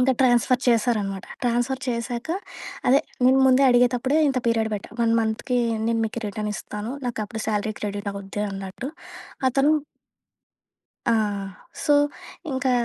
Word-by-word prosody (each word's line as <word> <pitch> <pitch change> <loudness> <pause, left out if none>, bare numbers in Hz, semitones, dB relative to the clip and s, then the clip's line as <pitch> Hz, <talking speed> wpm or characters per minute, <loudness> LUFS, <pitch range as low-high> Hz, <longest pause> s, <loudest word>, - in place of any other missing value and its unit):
ఇంక 255 +1 +4
ట్రాన్స్‌ఫర్ 245 0 +4
చేశారనమాట. 210 -5 +1 0.2
ట్రాన్స్‌ఫర్ 245 +2 0
చేశాక, 235 +3 -3 0.6
అదే, 270 +3 +6 0.2
నేను 260 +1 +6
ముందే 260 +1 +5
అడిగేతప్పుడే 250 +4 +3
ఇంత 265 - +1
పీరియడ్ 225 -1 +2
బెట్టా. 200 - -7
1 230 0 +3
మంత్‌కీ 225 +3 -1 0.3
నేను 230 0 +1
మీకి 235 +2 -5
రిటర్నిస్తాను. 210 +1 -4
నాకప్పుడు 220 -2 -4
శాలరీ 215 0 0
క్రెడిటవుద్ది 200 -1 -4
అన్నట్టు. 195 +6 -6 0.6
అతను 275 +3 +3 1.4
ఆ! - - +4 0.7
సో, 295 - +4 0.6
ఇంకా 260 0 0
235 Hz, 115 wpm, -24 LUFS, 210-255 Hz, 1.4 s, అదే